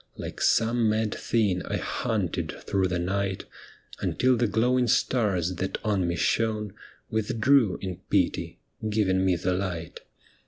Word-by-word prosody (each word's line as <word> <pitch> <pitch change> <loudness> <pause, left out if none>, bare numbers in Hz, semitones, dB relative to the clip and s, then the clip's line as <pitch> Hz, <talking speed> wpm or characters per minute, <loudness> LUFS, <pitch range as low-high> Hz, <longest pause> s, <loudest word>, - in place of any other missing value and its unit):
Like - - -7
some 115 0 +3
mad 110 0 0
thing, 105 -6 0
I - - -1
hunted - - -2
through 95 -1 +1
the 90 -1 -1
night, 95 +2 -2 0.5
Until 130 0 +2
the 120 0 +1
glowing 125 +4 +2
stars 100 -7 +1
that 95 - -2
on 100 -5 +1
me 85 - -1
shone 105 +2 0 0.4
Withdrew 110 0 +2
in 95 -2 -4
pity, - - 0 0.3
giving 95 -3 +2
me 95 -1 +3
the 90 +2 -1
light. 90 -3 -4
105 Hz, 135 wpm, -26 LUFS, 95-115 Hz, 0.5 s, some